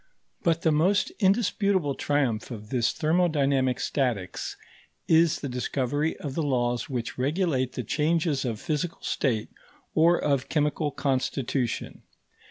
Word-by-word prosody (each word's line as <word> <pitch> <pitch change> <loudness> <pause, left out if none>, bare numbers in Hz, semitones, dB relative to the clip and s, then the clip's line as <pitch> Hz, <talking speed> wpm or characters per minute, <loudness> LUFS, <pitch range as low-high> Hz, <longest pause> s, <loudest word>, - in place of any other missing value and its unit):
But 165 -1 +1
the 160 - +4
most 180 +7 +2
indisputable 195 -6 +2
triumph 130 -6 0
of 105 -4 -8
this 120 -3 +2
thermodynamic 145 -6 +1
statics 120 -10 -2 0.5
is 165 0 +4
the 140 - -3
discovery 135 +4 -1
of 140 -3 -5
the 165 - -1
laws 125 -3 0
which 125 -2 -4
regulate 135 -3 0
the 125 - -3
changes 155 - +1
of 115 -5 -3
physical 155 +2 -3
state 115 -6 0 0.4
or 170 +2 +5
of 140 -3 0
chemical 150 0 +1
constitution. 130 -3 -2
145 Hz, 125 wpm, -27 LUFS, 125-160 Hz, 0.5 s, or